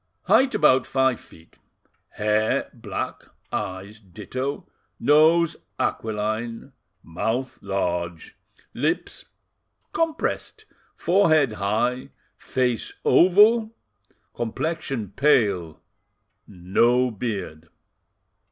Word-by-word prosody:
"'Height 265 0 +3
about 130 -4 +4
five 130 -3 +1
feet; 80 0 -19 0.6
hair 110 +5 0
black, 110 -5 -6 0.3
eyes 100 +1 -5
ditto, 130 +8 -5 0.3
nose 155 +4 +4 0.2
aquiline, 110 +3 -3 0.3
mouth 110 +10 -3
large, 90 -4 -3 0.4
lips - - -2 0.7
compressed, 330 +6 -2 0.3
forehead 155 - +3
high, 110 +5 -1 0.3
face 125 -3 -2
oval, 215 +5 +5 0.6
complexion 120 - -3
pale, 100 - +2 0.7
no 115 +7 +1
beard. 95 -8 -5
120 Hz, 70 wpm, -24 LUFS, 100-145 Hz, 0.7 s, oval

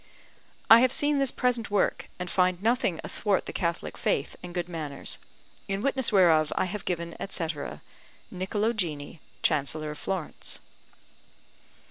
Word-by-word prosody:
I 225 - +10
have 255 0 +4
seen 290 +1 +4
this 275 -1 +2
present 245 -3 0
work, 205 -1 +1
and 180 - -4
find 180 0 +1
nothing 225 -7 +1
athwart 205 -3 0
the - - -6
Catholic 170 -1 -2
faith 140 - 0
and 180 - -8
good 175 0 -2
manners: 155 -5 -3 0.5
in 195 +1 -2
witness 265 -3 +2
whereof 165 -6 +5
I - - +2
have 195 +1 -5
given, 170 -2 -3
etc. 160 - -4 0.5
NICOLO 205 +5 0
GINI, 160 -7 -3 0.2
Chancellor 155 0 0
of 150 - -8
Florence. 190 -5 -4
180 Hz, 140 wpm, -28 LUFS, 165-215 Hz, 0.5 s, I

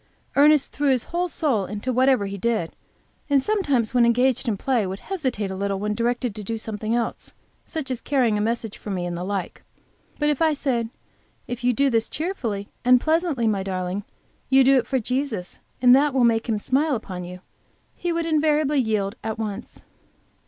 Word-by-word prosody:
Ernest 295 0 +5
threw 285 0 0
his 255 -3 +2
whole 350 +1 -2
soul 265 - 0
into 210 +5 -3
whatever 255 -3 +3
he 195 0 -4
did, 215 -4 -1 0.5
and 280 -1 +5
sometimes 275 - 0
when 245 -1 +4
engaged 250 +2 +2
in 215 -3 0
play 240 -3 0
would 190 +1 -4
hesitate 260 - -3
a - - -4
little 200 0 -1
when 210 +2 -1
directed 240 +1 -1
to 210 0 -7
do 225 +3 -3
something 220 0 -3
else, 235 -1 -3 0.3
such 310 -5 -5
as 250 - -3
carrying 255 -7 +2
a 210 - 0
message 225 -1 -2
for - - -8
me, 185 -3 -2
and 175 0 -3
the 175 - -4
like. 195 0 -4 0.6
But 295 0 +2
if 295 - -3
I 320 -1 +4
said, 245 -6 -1 0.6
"If 245 0 -6
you 250 - +4
do 275 +3 +2
this 225 -1 +1
cheerfully 235 - -3 0.2
and 250 0 +6
pleasantly, 315 -4 +1
my 205 -3 +1
darling, 185 +1 -3 0.5
you 265 0 +6
do 270 +1 +5
it - - -4
for 265 - +1
Jesus, 250 -5 -3 0.2
and 250 0 +8
that 280 0 +2
will 260 - +4
make 230 0 +2
Him 220 - +1
smile 275 +7 +1
upon 185 -5 -6
you," 180 +1 -9 0.5
he 350 - -3
would 335 0 -1
invariably 300 -2 +2
yield 215 -3 0
at 220 0 -3
once. 215 -3 -6
240 Hz, 195 wpm, -23 LUFS, 210-275 Hz, 0.6 s, and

